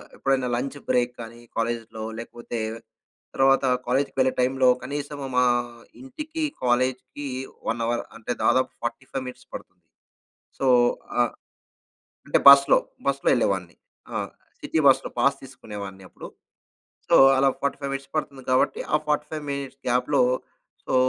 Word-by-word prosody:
ఎప్పుడైనా 135 -2 0
lunch 135 +4 -3
break 125 -1 +2
కానీ, 115 +1 -10 0.2
కాలేజిలో 115 -1 -3 0.2
లేకపోతే 120 0 -6 0.8
తర్వాత 135 0 +4 0.2
కాలేజికి 135 +2 0
వెళ్ళే 130 0 +3
టైమ్‌లో 130 0 +3
కనీసం 145 +2 -5 0.2
మా 125 - +5 0.6
ఇంటికి, 305 +5 -6 0.2
కాలేజికి 130 +3 0 0.4
1 115 +1 -1
అవర్ 120 +1 -1
అంటే 115 +2 -5
దాదాపు 130 - +3
45 130 +2 -4
మినిట్స్ 125 - -10
పడుతుంది. - - -11 0.7
సో, 135 - +1 0.5
ఆహ్, 120 - +1 0.9
అంటే - - +3
బస్సులో 140 0 +8 0.3
బస్సులో 140 0 0
వెళ్ళేవాడిని, 95 -8 0 0.4
ఆ! - - -1 0.4
సిటీ 160 - -1
బస్‌లో 135 - +3
పాస్ 140 0 +3
తీసుకునేవాడిని 100 -7 -9
అప్పుడు. - - -10 0.8
సో, - - +6 0.2
అలా 135 0 +4
45 140 0 -2
మినిట్స్ 135 +2 -8
పడుతుంది 140 -4 -4
కాబట్టి, 130 - +2
ఆ - - +7
45 150 0 -1
మినిట్స్ 140 -1 -5
గ్యాప్‌లో. 125 +3 +2 0.6
సో, - - -2
130 Hz, 125 wpm, -24 LUFS, 120-140 Hz, 0.9 s, బస్సులో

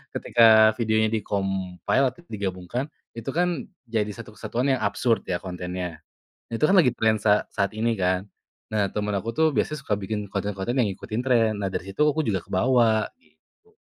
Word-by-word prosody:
ketika 110 -2 +6
videonya 110 -1 +2
di-compile, 95 +4 0
atau 175 - -19
digabungkan, 100 - -3 0.3
itu 115 - -8
kan 175 -5 +1 0.2
jadi 110 -2 0
satu 110 -2 -10
kesatuan 125 +6 -1
yang 120 - -6
absurd 115 -5 +1
ya 90 -1 -1
kontennya. 90 -2 -5 0.5
Nah - - -5
itu - - +2
kan 195 - +4
lagi 135 -9 +5
tren 110 -1 +3
sa 105 -1 +2
saat 100 +2 0
ini 115 +1 +1
kan, 90 +1 +1 0.5
nah 105 -2 +1
teman 105 -1 -2
aku 105 +4 -2
tuh 160 - +4
biasanya 150 - 0
suka 105 - 0
bikin 105 +1 -4
konten-konten 100 +3 -2
yang 120 -5 +3
ngikutin 110 +5 -4
tren. 115 -4 +3
Nah 95 - -1
dari 95 - -4
situ 125 - 0
aku 150 +1 +2
juga 95 -4 0
kebawa 115 +1 +2
gitu. 440 +10 -33
110 Hz, 175 wpm, -25 LUFS, 95-120 Hz, 0.5 s, ketika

